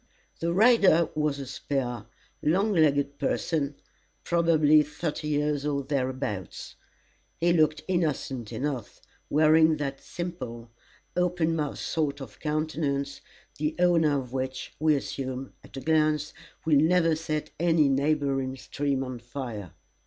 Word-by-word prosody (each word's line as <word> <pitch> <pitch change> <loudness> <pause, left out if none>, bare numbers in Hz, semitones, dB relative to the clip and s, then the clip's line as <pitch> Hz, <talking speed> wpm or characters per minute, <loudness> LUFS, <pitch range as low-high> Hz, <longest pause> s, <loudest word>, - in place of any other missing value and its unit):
The 170 +1 0
rider 195 -4 +5
was 150 -2 0
a 140 - -5
spare, 130 -1 -3 0.3
long 195 +7 +2
legged 145 -4 +2
person, 145 -3 -1 0.5
probably 160 -3 +4
thirty 150 +1 -4
years 150 -1 0
or 145 -1 -1
thereabouts. 130 - -3 0.6
He 170 +1 +3
looked 155 -2 +2
innocent 145 - -1
enough, 135 -6 -4 0.3
wearing 155 +1 +5
that 140 -2 -4
simple, 120 -10 -6 0.4
open 175 -2 +1
mouthed 150 -3 -2
sort 145 -3 -1
of 130 -7 -10
countenance, 150 -2 -2 0.4
the 150 +1 -1
owner 165 -5 +3
of 125 -1 -8
which, 130 0 -4
we 155 0 +4
assume, 130 -1 -4
at - - -12
a - - -4
glance, 155 -1 +1 0.3
will 155 -2 +4
never 165 +1 +4
set 155 -1 -3
any 165 -3 +4
neighbouring 135 -1 0
stream 140 0 -2
on 130 -2 -6
fire. 120 - -7
150 Hz, 125 wpm, -27 LUFS, 135-160 Hz, 0.6 s, rider